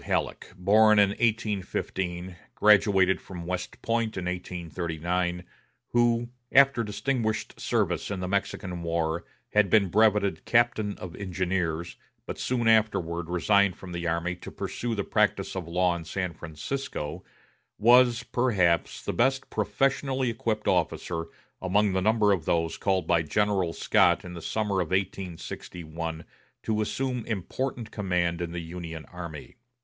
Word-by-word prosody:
Halleck, - - -2
born 105 +4 +5
in 100 -1 +6
1815, 95 -5 -2 0.2
graduated 100 -3 +4
from 90 -3 -8
West 90 0 -5
Point 115 -2 0
in 90 - -3
1839, 90 0 -3 0.5
who, 120 0 +2 0.2
after 135 -3 +5
distinguished 110 0 -2
service - - 0
in 100 -2 -3
the 90 - -3
Mexican 95 -2 -2
war, 85 0 -1 0.3
had 105 -2 +4
been 100 -3 +4
brevetted 105 -4 +3
captain 115 -3 +2
of 90 -2 -8
Engineers, 90 -3 -2 0.3
but - - -6
soon 120 -2 0
afterward 90 -7 +2
resigned 100 +2 +3
from 95 - -10
the 85 0 -3
army 85 +2 0
to - - -9
pursue 120 -1 -4
the 100 - -1
practice - - +1
of 90 -3 -4
law 90 +1 +2
in 85 - -6
San 90 +2 -3
Francisco, 80 - -5 0.5
was, 120 +2 +5
perhaps, 110 -9 +1
the - - -1
best 135 +2 +1
professionally 135 -2 0
equipped 110 -1 -2
officer 85 -2 0 0.4
among 100 +2 +2
the 95 - +1
number 110 +1 +3
of 90 -6 0
those 85 -1 +1
called 95 -3 0
by 85 0 +3
General 95 +1 +1
Scott 85 +3 +3
in 90 - -7
the 85 - -7
summer 105 0 0
of 85 - -2
1861 85 -3 -4 0.4
to 110 -1 0
assume 125 +2 -2
important 120 +4 -3
command 90 -4 0
in 85 -1 -3
the 85 0 -4
Union 80 -1 -7
army. 85 -4 -8
95 Hz, 140 wpm, -27 LUFS, 85-110 Hz, 0.5 s, in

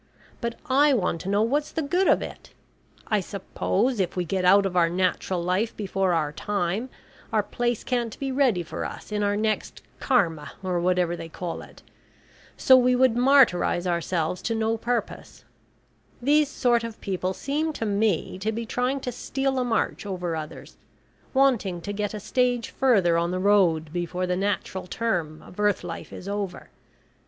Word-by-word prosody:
But 235 -1 -2
I 285 +1 +4
want 180 -6 -1
to 190 - -5
know 205 +2 +3
what's 290 +6 0
the 320 - -2
good 355 +7 +1
of - - +4
it? - - -10 0.5
I 215 -2 +1
suppose 200 +4 -1
if 180 -2 -1
we 180 -1 -1
get 185 +2 -1
out 195 +2 +6
of 185 -2 -2
our 170 -2 +4
natural 185 0 0
life 185 +6 0
before 195 -3 0
our 155 -3 0
time, 200 +7 -2 0.4
our - - +2
place 240 -2 -2
can't 240 -3 -2
be 275 -1 -3
ready 255 -10 +2
for 165 - -5
us - - -7
in 210 0 -1
our 205 0 +1
next 215 0 -2 0.2
Karma, 170 - +1
or 180 -2 0
whatever 180 -1 +1
they 165 -1 -8
call 170 +1 -5
it. - - -15 0.7
So 260 - +6
we 250 0 +4
would 255 -2 +4
martyrise 245 -9 +4
ourselves 170 0 -1
to 230 - -1
no 220 0 +1
purpose. 240 +2 -4 0.7
These 290 +3 +3
sort 240 -4 +2
of 230 -1 -6
people 185 -1 -2
seem 300 - -1
to 225 - -3
me 200 -3 0
to 215 +3 -1
be 230 +1 -4
trying 250 +4 -1
to 250 - -3
steal 270 +2 -2
a - - +1
march 225 -3 -1
over 180 -3 -3
others, 155 -1 -8 0.5
wanting 245 -10 +2
to 205 +4 -5
get 205 +1 -3
a - - -4
stage 245 +1 0
further 195 -11 +3
on 170 0 0
the 180 - -2
road 180 -6 +3
before 180 +1 -2
the 180 0 0
natural 190 -1 -2
term 175 -8 -2
of 180 - -14
earth 210 -3 +2
life 170 -2 -7
is 185 - -9
over. 200 -2 -4
205 Hz, 180 wpm, -25 LUFS, 180-245 Hz, 0.7 s, out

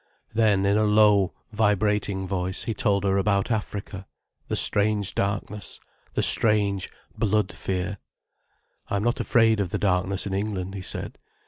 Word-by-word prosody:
Then 105 -3 +3
in 100 +1 +3
a 110 - +3
low, 105 -2 +4 0.2
vibrating 105 -2 +1
voice 95 0 -2
he 115 - -2
told 100 -1 +1
her 100 0 +2
about 100 +2 +1
Africa, 100 -3 -4 0.4
the - - -2
strange 105 -1 +2
darkness, 100 0 -3 0.4
the - - +1
strange, 100 -3 +2 0.3
blood 105 -2 +1
fear. 95 +1 -3 0.9
"I - - -2
am 100 - 0
not 120 +1 0
afraid 115 -4 +3
of 100 -3 -1
the - - -2
darkness 95 0 0
in 100 - -4
England," 95 -2 -3
he 100 - -5
said. - - -6
100 Hz, 150 wpm, -25 LUFS, 95-105 Hz, 0.9 s, low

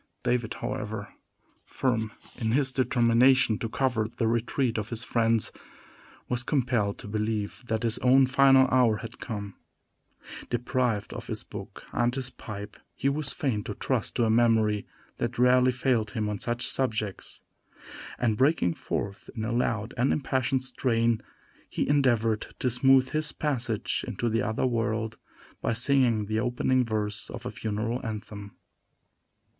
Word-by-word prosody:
David, 120 -2 0
however, 105 -1 -5 0.5
firm 115 -4 -1 0.2
in 110 -1 -1
his 135 0 +3
determination 125 -2 +3
to 115 - -3
cover 120 -4 0
the 115 0 -2
retreat 115 +1 0
of 105 +1 -5
his 115 0 -3
friends, 115 -3 +2 0.8
was 125 0 -1
compelled 120 -7 0
to - - -9
believe 105 +1 -2
that 110 0 -1
his 115 -1 +1
own 130 +1 +5
final 135 0 +5
hour 120 -4 +4
had 115 +2 -9
come. 100 -4 -5 1.0
Deprived 120 -3 -1
of - - -7
his - - -4
book - - -9
and 120 +1 +1
his 130 -2 -2
pipe, 105 -3 -8 0.2
he 140 - +1
was 140 0 -2
fain 130 -11 -1
to - - -4
trust - - -1
to 120 - +2
a - - +1
memory 110 -3 +3 0.3
that 120 +1 -3
rarely 125 +1 +5
failed 125 -4 0
him 105 -1 -2
on 105 -1 -3
such 120 0 0
subjects; 110 -6 -1 0.7
and 110 -3 +1
breaking 135 - +3
forth 100 +4 -4
in 110 -2 -3
a 115 - -2
loud 115 -1 -1
and 125 +3 +2
impassioned 130 -2 0
strain, 115 -3 +1 0.5
he - - -1
endeavored 120 -6 +2
to 125 - 0
smooth 130 +1 +4
his 155 0 0
passage 120 -7 -2
into 120 - -1
the 115 0 +1
other 110 +4 0
world 115 -2 -1 0.4
by 115 - 0
singing 115 -2 +3
the 110 +1 -1
opening 125 +2 +1
verse 105 -3 -3
of - - -8
a - - -3
funeral 110 +4 -3
anthem. 105 -3 -6
115 Hz, 150 wpm, -27 LUFS, 110-130 Hz, 1.0 s, own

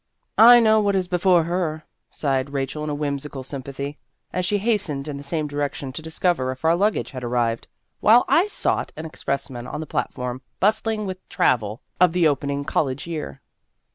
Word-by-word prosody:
" - - -51 0.2
I - - +7
know 220 -1 +5
what 200 -2 +1
is 185 -2 0
before 180 -1 +3
her," 165 -2 -2 0.3
sighed 135 -2 -1
Rachel 140 +2 -3
in 150 -1 -2
whimsical 140 -2 -3
sympathy, 140 +2 -6 0.3
as 180 0 0
she 205 - +2
hastened 195 -10 -1
in 145 -2 -4
the - - -7
same 155 +2 -2
direction 145 -2 -3
to 160 - -5
discover 160 -3 0
if 130 +3 -5
our 165 +1 +5
luggage 205 +4 0
had 130 -2 -7
arrived, 120 -1 -1 0.3
while 230 +3 +6
I 360 +5 +4
sought - - -1
an 160 - -6
expressman 135 -5 -4
on 150 - -5
the 160 - -4
platform 125 -3 -3 0.2
bustling 220 +1 +1
with 185 -1 -7
travel 110 -2 +1 0.2
of 180 -2 +5
the 175 -2 +4
opening 140 0 -1
college 135 -2 -1
year. 155 - -6
150 Hz, 180 wpm, -23 LUFS, 135-180 Hz, 0.3 s, I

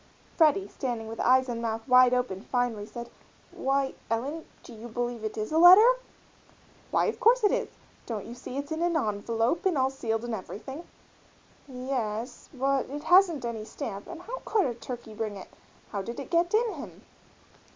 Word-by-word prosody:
Freddie, 335 +4 +4
standing 240 -5 -4
with 225 +1 -7
eyes 260 +1 +4
and 235 -2 -3
mouth 225 0 -3
wide 250 -1 +7
open, 245 -7 -1
finally 240 -3 -1
said, 235 +1 -7 0.4
"Why, 270 0 0 0.2
Ellen, 275 +8 -2 0.2
do - - -12
you 225 +1 -9
believe 240 0 -3
it 215 0 -4
is 215 +4 -3
a 315 - +3
letter?" 370 +6 +10 1.0
"Why, - - +2
of - - -2
course 485 +2 +4
it 415 - +5
is! - - -1 0.4
Don't 220 -4 -4
you 235 - -8
see 250 +1 -8
it's 285 +1 -5
in 315 +1 -2
a' 335 -8 +1
envelope 225 - -1
and 370 -6 +1
all 265 0 +2
sealed 225 -3 -2
and 240 - -4
everything?" 265 - -7 0.8
"Yes, 250 -3 -4
but 270 -1 0
it 290 +2 -6
hasn't 350 -5 +5
any 230 -2 -4
stamp 200 -2 -6
and 350 0 -9
how - - -6
could 430 -3 +2
a 250 - -1
turkey 235 -1 -8
bring 215 -2 -4
it 190 - -10 0.4
how 200 - -2
did 235 +5 -6
it 280 - -8
get 345 0 +2
in 445 0 +2
him?" 295 -4 -10
250 Hz, 185 wpm, -28 LUFS, 225-315 Hz, 1.0 s, letter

